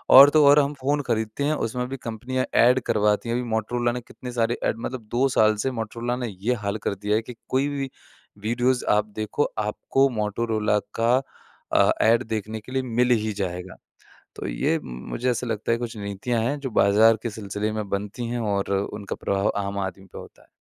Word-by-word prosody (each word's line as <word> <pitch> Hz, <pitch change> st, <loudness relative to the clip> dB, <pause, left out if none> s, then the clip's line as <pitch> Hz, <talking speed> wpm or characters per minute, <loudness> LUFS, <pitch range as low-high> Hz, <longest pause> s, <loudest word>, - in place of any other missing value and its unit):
और 140 Hz, +2 st, +11 dB
तो 155 Hz, 0 st, +5 dB
और 145 Hz, +1 st, +8 dB
हम 145 Hz, 0 st, +1 dB
फ़ोन 145 Hz, +2 st, +1 dB
खरीदते 110 Hz, +4 st, -1 dB
हैं, 150 Hz, +2 st, +2 dB
उसमें 125 Hz, +2 st, -3 dB
भी 135 Hz, -, -4 dB
कंपनियाँ 125 Hz, +2 st, -3 dB, 0.2 s
ऐड 125 Hz, +2 st, +5 dB
करवाती 105 Hz, +1 st, +2 dB
है। 115 Hz, -, 0 dB
अभी 125 Hz, -, -1 dB
मोटोरोला 120 Hz, +2 st, 0 dB
ने 125 Hz, +1 st, -4 dB
कितने 125 Hz, +1 st, -9 dB
सारे 120 Hz, 0 st, 0 dB
ऐड -, -, 0 dB
मतलब 125 Hz, -4 st, -6 dB
2 130 Hz, +3 st, +4 dB
साल 110 Hz, 0 st, +5 dB
से 135 Hz, -, +1 dB
मोटोरोला 115 Hz, +2 st, -3 dB
ने 125 Hz, -1 st, -3 dB
ये 100 Hz, +5 st, -1 dB
हाल 100 Hz, +1 st, -1 dB
कर -, -, 0 dB
दिया 105 Hz, +2 st, -1 dB
है 110 Hz, -, +2 dB
कि, 120 Hz, +1 st, -10 dB
कोई 135 Hz, +2 st, +2 dB
भी 140 Hz, -2 st, -3 dB, 0.5 s
वीडियोज़ 120 Hz, +4 st, +1 dB
आप 105 Hz, -, +1 dB
देखो, 110 Hz, +7 st, -1 dB
आपको 110 Hz, +5 st, +1 dB
मोटोरोला 105 Hz, 0 st, 0 dB, 0.2 s
का 115 Hz, +2 st, +4 dB, 0.6 s
अ, -, -, +5 dB
ऐड 115 Hz, +3 st, +4 dB
देखने 110 Hz, 0 st, -3 dB
के 110 Hz, +4 st, -13 dB
लिए 130 Hz, 0 st, 0 dB
मिल 125 Hz, 0 st, +1 dB
ही 110 Hz, -2 st, +2 dB
जाएगा। 90 Hz, 0 st, -4 dB, 0.6 s
तो -, -, -5 dB
ये -, -, 0 dB
मुझे 65 Hz, -, -3 dB
ऐसा 125 Hz, +1 st, -2 dB
लगता 110 Hz, -1 st, -1 dB
है 115 Hz, -, +2 dB
कुछ 120 Hz, -1 st, -5 dB
नीतियाँ 100 Hz, +3 st, -2 dB
हैं, 140 Hz, +6 st, -1 dB
जो 135 Hz, -2 st, -4 dB
बाज़ार 110 Hz, +2 st, +5 dB
के 115 Hz, -, -2 dB
सिलसिले 105 Hz, 0 st, -3 dB
में 110 Hz, -2 st, -3 dB
बनती 100 Hz, +4 st, -3 dB
हैं 120 Hz, 0 st, -2 dB
और 100 Hz, -3 st, -1 dB
उनका 100 Hz, 0 st, -4 dB
प्रभाव 100 Hz, 0 st, 0 dB
आम 100 Hz, 0 st, -4 dB
आदमी 95 Hz, 0 st, -4 dB
पे -, -, -11 dB
होता -, -, -13 dB
है। -, -, -25 dB
115 Hz, 205 wpm, -24 LUFS, 105-125 Hz, 0.6 s, और